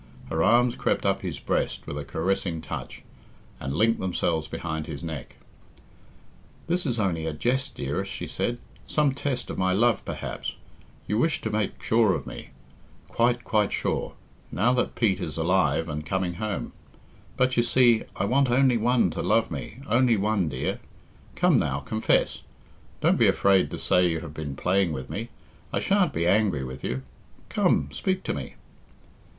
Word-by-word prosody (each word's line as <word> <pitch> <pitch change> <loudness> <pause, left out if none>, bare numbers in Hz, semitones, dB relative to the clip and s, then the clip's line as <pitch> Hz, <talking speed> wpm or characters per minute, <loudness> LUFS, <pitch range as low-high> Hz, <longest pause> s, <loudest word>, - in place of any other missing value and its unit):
Her 80 0 +1
arms 120 +3 +4
crept - - 0
up - - +1
his - - -4
breast - - -2
with - - -5
a 75 - -4
caressing 85 +3 -1
touch, - - -7 0.6
and 70 +1 -3
linked 115 +6 +3
themselves 85 -3 -1
behind 80 -2 -4
his 70 -4 -6
neck. 80 -4 -6 1.3
"This 175 -1 0
is 120 -3 -1
only 85 -6 0
a 80 - -2
jest, 130 - -1
dearest," 90 +8 -3
she - - -5
said, 120 - -2 0.3
"some 150 -3 +2
test 135 -3 -3
of - - -5
my 95 0 +2
love, 115 +1 +3
perhaps. - - -5 0.5
You 105 +2 +1
wished 160 +5 +1
to 110 - -2
make 105 -2 -2
sure 110 -5 +3
of - - -5
me - - -8 0.6
quite, 120 +1 +1
quite 105 -3 +1
sure - - -1 0.4
now 115 +7 +2
that 125 - 0
Pete 110 -6 +2
is 80 - -4
alive 80 -2 +2
and 75 -1 -4
coming 95 +2 -1
home. 105 -2 -3 0.6
But, 130 0 +2
you 120 - +4
see, 120 -2 +4
I 100 - 0
want 130 +5 +3
only 130 0 +4
one 115 -4 +2
to - - -3
love 110 +3 +2
me, 75 - -6
only 120 0 +4
one, 100 -4 +1
dear. 65 -2 -2 0.6
Come, - - +4
now, 70 0 0
confess. 110 +10 0 0.6
Don't - - +3
be - - +6
afraid 100 -1 +4
to - - -5
say 90 0 +3
you 80 -2 -1
have 75 - -8
been 75 -3 -5
playing 90 +1 +1
with 65 -3 -6
me. - - -4 0.4
I - - 0
shan't 195 -2 +2
be 85 - -1
angry 95 -7 +2
with 65 +1 -7
you. 65 +1 -3 0.5
Come, 70 0 +2
speak 185 - -1
to - - -1
me." - - -6
100 Hz, 175 wpm, -26 LUFS, 80-120 Hz, 1.3 s, be